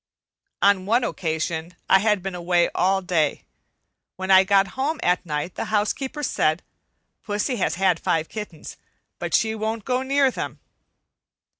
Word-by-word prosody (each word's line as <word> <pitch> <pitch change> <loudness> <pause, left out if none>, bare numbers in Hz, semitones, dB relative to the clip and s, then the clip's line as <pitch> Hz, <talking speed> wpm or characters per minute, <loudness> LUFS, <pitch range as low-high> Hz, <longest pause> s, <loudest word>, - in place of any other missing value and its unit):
On 195 -2 +3
one 235 +4 +3
occasion 165 -3 -3
I 190 - +6
had 210 -2 +1
been 195 -1 -4
away 175 0 +1
all 190 +2 +1
day. 170 -4 0 0.7
When 190 +1 -2
I 190 0 +8
got 195 0 +3
home 280 - -2
at 180 0 +2
night 150 +3 -3
the - - -4
housekeeper 260 +8 -1
said, 155 - +1 0.6
"Pussy 210 +4 -2
has 170 -4 0
had 185 0 +2
five 160 -1 0
kittens, 210 -7 -8 0.4
but - - 0
she 220 -2 +2
won't 220 0 -3
go 255 0 0
near 275 0 +2
them." - - -5
195 Hz, 150 wpm, -23 LUFS, 175-220 Hz, 0.7 s, I